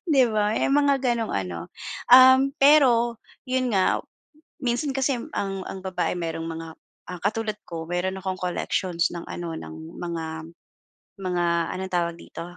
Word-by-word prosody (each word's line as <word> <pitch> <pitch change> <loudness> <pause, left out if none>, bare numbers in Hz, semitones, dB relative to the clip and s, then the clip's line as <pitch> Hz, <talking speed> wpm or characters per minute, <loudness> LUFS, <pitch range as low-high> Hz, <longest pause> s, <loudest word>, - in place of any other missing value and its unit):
di 265 - +7
ba, 210 -1 +1
may - - +1
mga 285 -1 +3
gano'ng 235 -3 0
ano. 90 -3 -3 0.4
Um, 260 +2 +8
pero 250 -6 +5 0.3
'yun 255 -1 0
nga, 190 - +3 0.6
minsan 245 +3 0
kasi 270 -1 +1 0.2
ang 195 -1 -2
ang - - -6
babae 185 -1 -1
merong 165 -1 -3
mga, 165 0 -6 0.4
ah, 175 - -9
katulad 215 +1 -1
ko 165 -1 -6
meron 180 +2 -2
akong 190 0 -3
collections 180 -1 -1
ng 170 - -5
ano, 170 -1 -5
ng 80 0 -9 0.2
mga 170 -2 -4 1.0
mga 180 -2 -1 0.3
anong 190 0 -5
tawag 170 -1 0
dito, - - -9
190 Hz, 150 wpm, -25 LUFS, 170-245 Hz, 1.0 s, Um